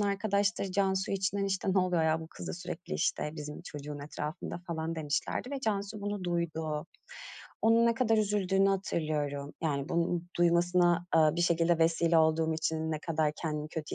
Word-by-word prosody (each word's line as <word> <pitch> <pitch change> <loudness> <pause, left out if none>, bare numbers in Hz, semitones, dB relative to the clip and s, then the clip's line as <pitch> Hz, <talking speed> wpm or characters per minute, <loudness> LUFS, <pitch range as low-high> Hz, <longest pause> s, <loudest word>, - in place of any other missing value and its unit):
arkadaşları 200 -2 0
Cansu 190 -1 +1
için, 195 +1 0
işte, 195 0 0
“Ne - - +5
oluyor 180 -3 +2
ya? 160 0 +2
Bu 160 - -7
kız - - -8
da - - -3
sürekli, 180 0 -6
işte, 150 - 0
bizim 150 0 -7
çocuğun 145 0 -7
etrafında.” 150 +4 -5
falan 165 -1 -3
demişlerdi 155 - -2
ve 275 -1 -3
Cansu 205 -2 -2
bunu 205 -2 -3
duydu. 160 -3 -2 0.8
Onun 230 +1 +5
ne 230 - +3
kadar 225 -3 +2
üzüldüğünü 195 -2 +2
hatırlıyorum. 150 -7 -1
Yani, 140 -2 -1
bunu 170 0 0 0.2
duymasına, 175 0 +3
eee, 155 -1 +6
bir - - 0
şekilde 170 0 +3
vesile 165 0 +3
olduğum 160 0 +3
için 160 0 -1
ne 155 - -2
kadar 155 -2 0
kendimi 150 -2 -3
kötü 155 -1 -5
170 Hz, 170 wpm, -31 LUFS, 160-195 Hz, 0.8 s, eee